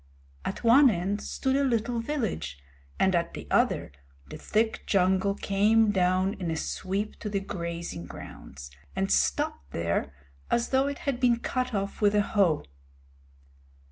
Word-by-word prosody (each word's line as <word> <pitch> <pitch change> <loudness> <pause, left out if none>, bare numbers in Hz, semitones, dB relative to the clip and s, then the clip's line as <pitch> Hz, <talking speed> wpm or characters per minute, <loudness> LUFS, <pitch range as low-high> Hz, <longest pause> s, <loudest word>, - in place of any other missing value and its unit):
At - - -4
one 260 +4 +7
end 200 +1 -1
stood 265 -1 -1
a 280 - +2
little 235 -2 0
village, 220 - -3 0.4
and 190 - +3
at 170 -1 0
the - - -7
other - - +2 0.4
the - - -6
thick 220 +1 0
jungle 190 +1 +2
came 210 +2 +3
down 185 0 +2
in 180 -3 -4
a 160 - -1
sweep 195 +5 -3
to 210 - -4
the 200 -1 0
grazing 170 - -5
grounds, 70 0 -10 0.2
and 95 - 0
stopped 65 0 +1
there 85 -4 -1 0.4
as 235 - +1
though 265 +1 +2
it 280 -1 -3
had 275 -4 -1
been 245 -2 +4
cut 255 0 -2
off 200 +2 -3
with 205 0 +4
a 205 - +4
hoe. 190 -8 +2
200 Hz, 155 wpm, -28 LUFS, 170-230 Hz, 0.4 s, one